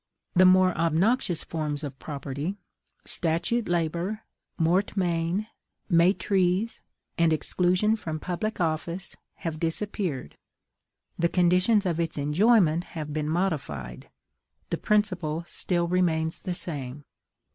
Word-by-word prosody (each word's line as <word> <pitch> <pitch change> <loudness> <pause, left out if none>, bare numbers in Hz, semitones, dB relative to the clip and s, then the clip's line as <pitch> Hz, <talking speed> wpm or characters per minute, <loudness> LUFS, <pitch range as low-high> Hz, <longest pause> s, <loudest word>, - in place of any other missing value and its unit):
The 185 +1 +6
more 185 0 +5
obnoxious 170 - +1
forms 150 -2 -3
of 140 -2 -6
property 145 +4 -4 0.5
statute 175 +8 0
labor, 175 +5 -1 0.4
mortmain, 175 +1 +1 0.5
maitrise, 185 +4 +2 0.4
and 165 -1 +4
exclusion 180 +6 +2
from 160 -7 -5
public 200 +7 -3
office 170 +2 -2 0.2
have 165 -4 -5
disappeared; 165 - -3 0.8
the 170 0 +3
conditions 185 +5 +3
of 170 -3 0
its 165 -2 -2
enjoyment 170 +3 +3
have 150 -2 -4
been 150 0 -2
modified: 140 - -2 0.6
the - - 0
principle 180 -7 0
still 175 0 +1
remains 165 -3 +1
the 180 - -4
same. 145 -4 -6
170 Hz, 105 wpm, -27 LUFS, 155-185 Hz, 0.8 s, The